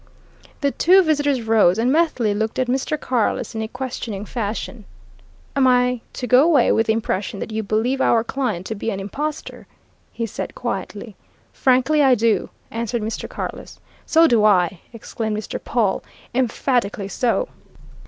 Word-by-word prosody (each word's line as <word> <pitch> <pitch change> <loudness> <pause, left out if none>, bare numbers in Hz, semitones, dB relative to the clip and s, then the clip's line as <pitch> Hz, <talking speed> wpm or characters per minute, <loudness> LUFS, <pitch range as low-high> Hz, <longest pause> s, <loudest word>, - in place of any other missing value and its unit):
The 280 -1 +2
two 375 +6 +5
visitors 290 -5 +1
rose, 220 -5 +4
and 240 +3 +2
Methley 290 -9 +2
looked 220 +2 -2
at 255 - +1
Mr. 265 +4 -1
Carless 245 -4 -1
in 220 - -3
a 220 - -3
questioning 235 -5 -5
fashion. 215 0 -4 0.7
"Am 270 -2 +4
I 250 -1 +3
to 250 - -4
go 250 +1 +6
away 295 -6 +4
with 225 - +2
the 220 - +3
impression 205 -3 -2
that - - -5
you 220 0 -2
believe 225 +6 0
our 225 -1 +3
client 230 -8 -3
to 220 - -3
be 220 +2 -4
an 195 -3 -3
impostor?" 295 +10 -5 0.4
he 230 - -3
said 220 - -6
quietly. 210 -2 -5 0.4
"Frankly 265 +4 +3
I 265 -3 +5
do!" 230 -1 +1 0.2
answered 235 0 -2
Mr. 220 +1 -4
Carless. - - -7 0.3
"So 325 +1 +5
do 235 -8 +4
I!" 185 -4 +3
exclaimed 220 -1 -4
Mr. 215 - -6
Pawle. 220 -5 0 0.3
"Emphatically 240 -4 0
so!" 245 - 0
235 Hz, 160 wpm, -21 LUFS, 215-260 Hz, 0.7 s, go